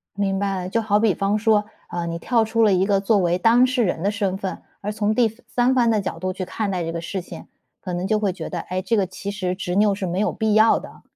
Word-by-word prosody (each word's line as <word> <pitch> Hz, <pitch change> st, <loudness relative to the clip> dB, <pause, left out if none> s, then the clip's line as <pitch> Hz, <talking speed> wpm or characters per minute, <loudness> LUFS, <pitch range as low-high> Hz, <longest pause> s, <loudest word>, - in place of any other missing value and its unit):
明 195 Hz, -1 st, 0 dB
白 195 Hz, -1 st, -1 dB
了， 180 Hz, 0 st, -4 dB
就 230 Hz, +3 st, 0 dB
好 210 Hz, -1 st, +2 dB
比 220 Hz, -4 st, +3 dB
方 200 Hz, +1 st, 0 dB
说， 210 Hz, -1 st, +3 dB, 0.2 s
呃， 175 Hz, -1 st, -3 dB
你 170 Hz, 0 st, -3 dB
跳 230 Hz, +4 st, +1 dB
出 225 Hz, +1 st, +1 dB
了 210 Hz, -3 st, +5 dB
一 185 Hz, +1 st, +3 dB
个 195 Hz, -1 st, +2 dB
作 205 Hz, +1 st, +2 dB
为 175 Hz, -1 st, +1 dB
当 235 Hz, +5 st, +5 dB
事 255 Hz, -1 st, 0 dB
人 175 Hz, -4 st, -1 dB
的 200 Hz, -, +2 dB
身 200 Hz, -2 st, -1 dB
份， 190 Hz, -1 st, -4 dB, 0.2 s
而 210 Hz, +1 st, -2 dB
从 215 Hz, 0 st, 0 dB
第 240 Hz, -1 st, +4 dB, 0.2 s
三 250 Hz, +1 st, +1 dB
方 240 Hz, -2 st, +3 dB
的 215 Hz, -2 st, +2 dB
角 165 Hz, -, -4 dB
度 185 Hz, +1 st, -2 dB
去 185 Hz, -, -4 dB
看 200 Hz, +3 st, -3 dB
待 180 Hz, -3 st, -2 dB
这 165 Hz, -, -3 dB
个 170 Hz, -, -4 dB
事 180 Hz, +2 st, -4 dB
情， -, -, -10 dB, 0.3 s
可 180 Hz, -2 st, -5 dB
能 180 Hz, +2 st, -2 dB
就 215 Hz, 0 st, +2 dB
会 205 Hz, -2 st, 0 dB
觉 190 Hz, -, -7 dB
得： -, -, -3 dB
“诶， 185 Hz, +1 st, -2 dB
这 220 Hz, +4 st, 0 dB
个 195 Hz, -2 st, +2 dB
其 190 Hz, +2 st, -6 dB
实 185 Hz, -3 st, -2 dB
执 180 Hz, -1 st, -4 dB
拗 205 Hz, 0 st, +3 dB
是 195 Hz, -1 st, -4 dB
没 180 Hz, +3 st, -2 dB
有 -, -, +1 dB
必 220 Hz, -1 st, -1 dB
要 220 Hz, +1 st, +5 dB
的。” -, -, -12 dB
200 Hz, 305 characters per minute, -22 LUFS, 185-220 Hz, 0.3 s, 了